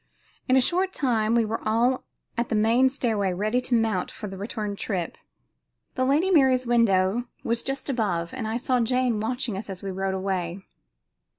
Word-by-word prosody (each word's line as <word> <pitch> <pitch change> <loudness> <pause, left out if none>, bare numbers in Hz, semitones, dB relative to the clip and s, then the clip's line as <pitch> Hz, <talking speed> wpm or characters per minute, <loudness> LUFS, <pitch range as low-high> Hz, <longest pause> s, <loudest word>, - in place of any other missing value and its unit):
In 255 - +4
a - - +5
short 365 +7 +1
time 230 -5 +1
we 235 -1 +3
were 220 +1 -3
all 235 +4 +1 0.3
at 235 -1 -1
the - - 0
main 230 +5 +4
stairway 220 -8 0
ready 215 +7 0
to 250 -1 0
mount 220 -5 +1
for - - -8
the 195 -1 -6
return 205 +1 -4
trip. 185 -4 -3 0.8
The 255 - 0
Lady 305 +8 +2
Mary's 265 -6 +4
window 230 -2 +2 0.2
was 235 0 0
just 270 0 -4
above, 200 -11 -1
and 245 -4 -4
I 220 +1 -1
saw 250 +1 +1
Jane 250 -1 +1
watching 235 0 -2
us 210 - -9
as 190 -1 -7
we 195 - -3
rode 190 0 -2
away. 190 -1 -3
225 Hz, 185 wpm, -25 LUFS, 200-255 Hz, 0.8 s, a